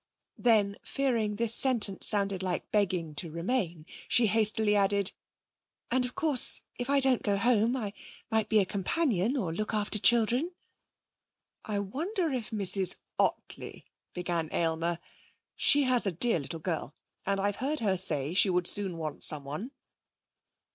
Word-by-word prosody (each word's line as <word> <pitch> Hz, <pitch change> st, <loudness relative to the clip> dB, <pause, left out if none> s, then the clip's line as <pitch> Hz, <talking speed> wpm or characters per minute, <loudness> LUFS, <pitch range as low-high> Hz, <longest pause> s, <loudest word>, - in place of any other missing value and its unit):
Then 210 Hz, -4 st, +2 dB
fearing 235 Hz, -7 st, -2 dB
this 230 Hz, +1 st, 0 dB
sentence 230 Hz, -7 st, +2 dB
sounded 200 Hz, -3 st, +2 dB
like 185 Hz, -2 st, -4 dB
begging 180 Hz, -6 st, -1 dB
to 165 Hz, +3 st, -3 dB
remain, 170 Hz, -1 st, -3 dB, 0.2 s
she 240 Hz, -, +3 dB
hastily 215 Hz, 0 st, +2 dB
added: 200 Hz, 0 st, +1 dB, 0.8 s
'And 250 Hz, 0 st, +1 dB
of 250 Hz, -, -8 dB
course 285 Hz, -5 st, +3 dB, 0.2 s
if 245 Hz, +2 st, -4 dB
I 280 Hz, 0 st, +3 dB
don't 265 Hz, -2 st, +2 dB
go 200 Hz, -2 st, -1 dB
home 235 Hz, +2 st, +1 dB
I 210 Hz, -5 st, -5 dB, 0.4 s
might 220 Hz, -1 st, -1 dB
be 220 Hz, -, +2 dB
a 200 Hz, -, +3 dB
companion 220 Hz, -, -1 dB
or 180 Hz, -10 st, -3 dB
look 215 Hz, +5 st, -4 dB
after 210 Hz, 0 st, 0 dB
children.' 240 Hz, -, +2 dB, 1.1 s
'I 210 Hz, -2 st, -3 dB
wonder 325 Hz, -, -3 dB
if 250 Hz, -4 st, -4 dB
Mrs 195 Hz, -4 st, +4 dB, 0.2 s
Ottley -, -, -3 dB
' -, -, -59 dB
began 175 Hz, -3 st, -3 dB
Aylmer. 165 Hz, 0 st, -1 dB, 0.6 s
'She 290 Hz, 0 st, +5 dB
has 250 Hz, -4 st, +4 dB
a -, -, 0 dB
dear 185 Hz, +3 st, +2 dB
little 155 Hz, +3 st, -6 dB
girl, 160 Hz, -3 st, -5 dB, 0.3 s
and 200 Hz, 0 st, 0 dB
I've 200 Hz, +1 st, -2 dB
heard 285 Hz, +5 st, -3 dB
her 200 Hz, -4 st, 0 dB
say 155 Hz, -5 st, 0 dB
she 195 Hz, +1 st, +4 dB
would 180 Hz, -1 st, 0 dB
soon 190 Hz, -2 st, +3 dB
want 155 Hz, -2 st, -6 dB
someone.' 150 Hz, -, +1 dB
205 Hz, 155 wpm, -28 LUFS, 180-240 Hz, 1.1 s, She